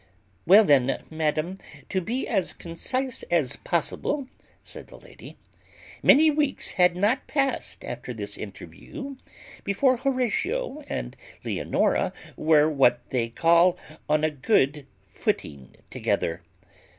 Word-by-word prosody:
Well 200 +5 +8
then, 135 -5 +3
madam, 155 +4 -1 0.3
to 190 - 0
be 235 +8 -3
as 195 -6 -1
concise 255 +10 -3
as 155 -8 +1
possible, 260 - -2 0.4
said - - -11
the - - -13
lady, - - -14 0.6
many 310 +2 +6
weeks 295 -2 0
had 180 -2 +3
not 210 +8 +1
passed 275 -2 -2
after - - -6
this - - -6
interview 275 -3 -9 0.5
before 250 +6 +2
Horatio 275 - -1
and - - -4 0.3
Leonora - - 0 0.2
were 155 -1 +4
what 125 -5 +2
they 120 -3 0
call 170 +7 +4 0.3
on 155 0 +2
a 155 - +2
good 145 - +1 0.2
footing 70 -7 -4 0.2
together. - - -1
180 Hz, 115 wpm, -25 LUFS, -, 0.6 s, Well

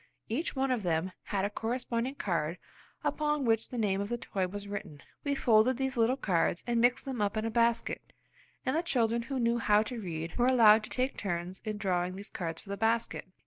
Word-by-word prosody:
Each 285 +10 -2
one 265 0 +1
of 245 -3 +1
them 175 0 0
had 195 -1 0
a - - 0
corresponding 240 +3 -2
card 170 - -1 0.5
upon 300 -2 0
which 225 -1 +2
the 250 - -5
name 200 -3 +1
of 200 - -3
the 240 - -1
toy 190 -5 -2
was 205 +2 -7
written. 200 -8 -6 0.2
We 285 -1 0
folded 235 0 +4
these 265 0 -1
little 240 +2 +3
cards 175 -7 +1
and 235 -1 +1
mixed 245 +1 +3
them 260 -5 -3
up 205 +1 0
in 215 - 0
a 225 - -1
basket, 235 0 +1 0.5
and 260 - +1
the 325 - +2
children 235 -8 +1
who 265 +3 -4
knew 235 0 +2
how 210 -1 +4
to 230 +1 -5
read 165 -3 -5
were 245 - +4
allowed 225 -4 +7
to - - -12
take 255 +1 -1
turns 180 -1 -3
in 215 -1 -2
drawing 185 -3 0
these 200 +1 -8
cards 165 -2 -4
from 200 - -9
the 200 - -3
basket. 225 +1 0
225 Hz, 220 wpm, -31 LUFS, 195-245 Hz, 0.5 s, allowed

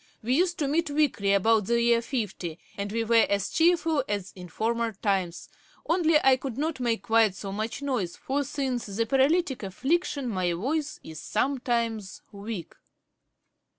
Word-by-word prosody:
We 245 +3 +1
used 350 +4 +2
to 290 - 0
meet 315 +3 +1
weekly, 285 -9 +1
about 210 +1 +3
the 235 0 +2
year 235 0 +3
fifty, 210 - -4 0.2
and 200 0 -4
we 230 +1 0
were 230 0 +4
as 200 -1 0
cheerful 330 -3 +3
as 205 -2 -2
in 180 -2 -10
former 230 +4 -1
times; 190 -4 -1 0.4
only 330 -2 +4
I 265 -1 +6
could 255 -2 -6
not 305 -1 -2
make 230 -5 0
quite 220 -2 +3
so 195 0 -6
much 215 +7 -4
noise, 245 -11 -1
for 280 +2 -2
since 265 -4 -3
the 210 +3 -1
paralytick 270 +4 +2
affliction 275 - -1
my 185 -6 0
voice 285 - -2
is 160 -1 -9
sometimes 230 -5 -1
weak.' 200 -3 -6
235 Hz, 160 wpm, -27 LUFS, 200-280 Hz, 0.4 s, I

